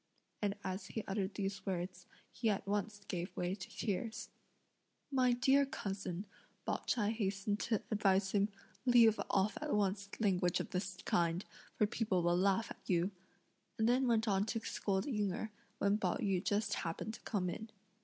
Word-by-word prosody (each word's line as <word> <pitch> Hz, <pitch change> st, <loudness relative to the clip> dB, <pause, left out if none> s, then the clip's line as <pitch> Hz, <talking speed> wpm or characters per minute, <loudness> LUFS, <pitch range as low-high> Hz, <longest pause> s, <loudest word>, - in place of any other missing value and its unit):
And 205 Hz, -1 st, +1 dB
as 190 Hz, +2 st, -3 dB
he 220 Hz, -, -4 dB
uttered 195 Hz, 0 st, -1 dB
these 195 Hz, -1 st, -2 dB
words, 180 Hz, -1 st, -3 dB, 0.2 s
he 230 Hz, -, 0 dB
at 200 Hz, -, 0 dB
once 205 Hz, +1 st, -1 dB
gave 175 Hz, +1 st, -4 dB
way 180 Hz, +1 st, 0 dB
to 190 Hz, -1 st, -7 dB
tears. 220 Hz, +2 st, -3 dB, 0.8 s
"My 255 Hz, -2 st, +4 dB
dear 265 Hz, +3 st, +5 dB
cousin," 200 Hz, -, -3 dB, 0.4 s
Pao -, -, +1 dB
ch'ai 210 Hz, -3 st, +2 dB
hastened 205 Hz, -1 st, -1 dB
to 220 Hz, -3 st, 0 dB
advise 195 Hz, -2 st, +3 dB
him, 205 Hz, 0 st, +3 dB, 0.3 s
"leave 235 Hz, -3 st, +6 dB
off 200 Hz, +2 st, +2 dB
at 300 Hz, -5 st, 0 dB
once 200 Hz, 0 st, 0 dB
language 180 Hz, -5 st, +2 dB
of -, -, -4 dB
this 185 Hz, 0 st, -2 dB
kind, 170 Hz, +2 st, +1 dB, 0.3 s
for 210 Hz, -, +4 dB
people 205 Hz, -4 st, 0 dB
will 175 Hz, 0 st, +3 dB
laugh 195 Hz, +4 st, +2 dB
at -, -, -9 dB
you;" 180 Hz, +1 st, +2 dB, 0.7 s
and 220 Hz, -, +3 dB
then 255 Hz, +2 st, +4 dB
went 225 Hz, -1 st, +3 dB
on 195 Hz, -1 st, +3 dB
to 225 Hz, -, 0 dB
scold 195 Hz, -3 st, -1 dB
Ying 210 Hz, -8 st, 0 dB
Erh, 220 Hz, +3 st, -4 dB, 0.3 s
when 200 Hz, +1 st, +2 dB
Pao 185 Hz, -4 st, +1 dB
yü 190 Hz, -2 st, +1 dB
just 210 Hz, +1 st, +1 dB
happened 170 Hz, +6 st, -3 dB
to -, -, -9 dB
come 195 Hz, -5 st, -1 dB
in. 220 Hz, +5 st, -4 dB
200 Hz, 175 wpm, -36 LUFS, 190-220 Hz, 0.8 s, leave